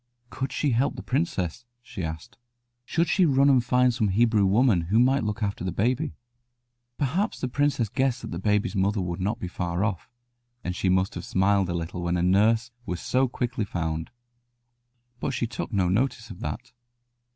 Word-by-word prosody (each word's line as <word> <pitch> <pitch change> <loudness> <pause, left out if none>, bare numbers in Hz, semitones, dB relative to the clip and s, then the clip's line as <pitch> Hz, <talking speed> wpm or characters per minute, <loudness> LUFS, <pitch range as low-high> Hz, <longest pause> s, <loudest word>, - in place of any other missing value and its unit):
Could 135 0 -3
she 145 - 0
help 125 +4 +1
the - - -7
princess? 125 - -1 0.2
she 115 -7 -6
asked. 80 0 -6 0.5
Should 170 +5 +1
she 180 +2 +3
run 140 0 +4
and 130 -3 +4
find 125 0 +3
some 115 -3 +1
Hebrew 105 0 +3
woman 105 -2 +4
who 105 - +3
might 130 +3 +4
look 105 +1 -2
after 100 -3 -2
the 90 - -1
baby? 120 +7 0 0.8
Perhaps 175 - -1
the - - -1
princess 140 -2 +1
guessed 130 +4 0
that - - -6
the 85 - -4
baby's 105 +2 +1
mother 100 +2 +1
would 90 -1 -3
not 100 +5 0
be 90 - -4
far 90 +1 -2
off, 100 -6 -3 0.5
and 90 - -3
she 95 - 0
must 95 +1 +2
have 85 - -6
smiled 95 0 +2
a 85 - -1
little 85 +1 -4
when 85 0 0
a 85 - 0
nurse 110 +6 +3
was 90 -6 -4
so 130 +1 +1
quickly 120 -2 -2
found. 80 -4 -3 1.1
But 130 - -2
she - - 0
took 120 +2 -5
no 95 -4 +2
notice 120 +4 0
of 90 - -10
that. 120 +1 -5
110 Hz, 190 wpm, -26 LUFS, 95-125 Hz, 1.1 s, run